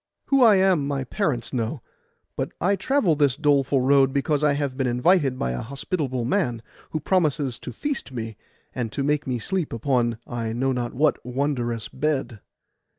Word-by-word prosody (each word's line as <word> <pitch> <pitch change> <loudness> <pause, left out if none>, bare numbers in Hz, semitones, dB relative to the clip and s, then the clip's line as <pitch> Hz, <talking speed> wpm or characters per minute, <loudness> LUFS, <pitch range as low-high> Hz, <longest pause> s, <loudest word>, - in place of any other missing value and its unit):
'Who 275 -1 +4
I 225 -4 +7
am 190 -7 +3
my 140 -2 -1
parents 130 - -2
know; 120 +2 -2 0.5
but - - -3
I 200 +4 +2
travel 195 - +2
this 145 -3 +2
doleful 140 -3 +2
road 135 0 +4
because 145 +2 0
I 150 -1 +4
have 140 -2 -2
been 130 -1 0
invited 135 +2 +2
by 60 - -1
a 60 - -3
hospitable 135 -1 -3
man, 120 -2 0 0.3
who 155 - -2
promises 150 -7 0
to - - -7
feast 290 - -4
me, 115 -3 -5 0.4
and 120 -4 -3
to 140 - -1
make 150 +1 0
me 125 -2 0
sleep 180 - -2
upon 120 -1 0
I 115 -2 -3
know 130 +3 0
not 120 -2 -3
what 150 +3 +2
wondrous 125 -3 -2
bed. 135 -5 -2
135 Hz, 175 wpm, -24 LUFS, 120-150 Hz, 0.5 s, I